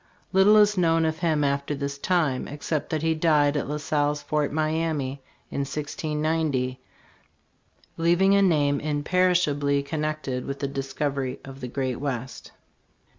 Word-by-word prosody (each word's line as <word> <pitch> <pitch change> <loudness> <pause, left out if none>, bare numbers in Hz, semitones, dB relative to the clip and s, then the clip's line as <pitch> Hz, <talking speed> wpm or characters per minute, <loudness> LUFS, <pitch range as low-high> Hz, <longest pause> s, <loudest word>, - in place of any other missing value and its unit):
Little 195 +3 +6
is 210 -2 +4
known 165 -1 +3
of 160 0 -1
him 160 -4 +1
after 140 +1 0
this 140 0 -4
time, 155 -7 0
except 150 +1 -3
that 155 -1 -2
he 160 0 +2
died 150 -2 +3
at 145 - -2
La 150 - -2
Salle's 145 0 0
Fort 150 -1 0
Miamis 155 -3 -1 0.3
in - - -3
1690, 150 -2 -2 1.2
leav 170 +1 +3
ing 195 +1 +5
a 200 - +5
name 145 -6 +3
imperishably 150 -2 +1
connected 150 -3 -3
with 140 0 -4
the 140 - -2
discovery 135 -1 -3
of 135 0 -10
the 125 - -4
Great 130 -1 -2
West. 130 -3 -5
150 Hz, 145 wpm, -25 LUFS, 140-160 Hz, 1.2 s, Little